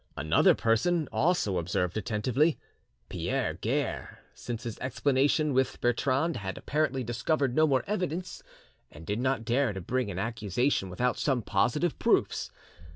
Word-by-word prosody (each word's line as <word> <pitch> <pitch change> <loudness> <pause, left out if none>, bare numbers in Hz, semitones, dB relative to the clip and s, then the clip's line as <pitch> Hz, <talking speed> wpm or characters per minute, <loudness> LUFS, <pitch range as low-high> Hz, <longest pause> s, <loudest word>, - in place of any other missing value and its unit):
Another 75 +3 +4
person 150 +8 +1
also 110 - +1
observed 90 +1 -1
attentively. 125 +8 +1 0.5
Pierre - - -2
Guerre - - -3 0.2
since 120 -2 -6
his 115 -3 -6
explanation 140 +3 +1
with 130 +1 +1
Bertrande 135 +6 +1
had 95 -1 -5
apparently 140 -3 -1
discovered 125 +3 0
no 155 +3 +4
more 135 -3 +2
evidence, 185 -3 -3 0.5
and 80 +2 -12
did 105 +5 -2
not 130 -2 0
dare 120 0 +1
to 95 - -5
bring 125 +5 -2
an 90 - -5
accusation 110 +1 -1
without 120 +7 -1
some 130 -5 0
positive 145 - 0
proofs. - - +1
125 Hz, 140 wpm, -29 LUFS, 110-145 Hz, 0.5 s, Another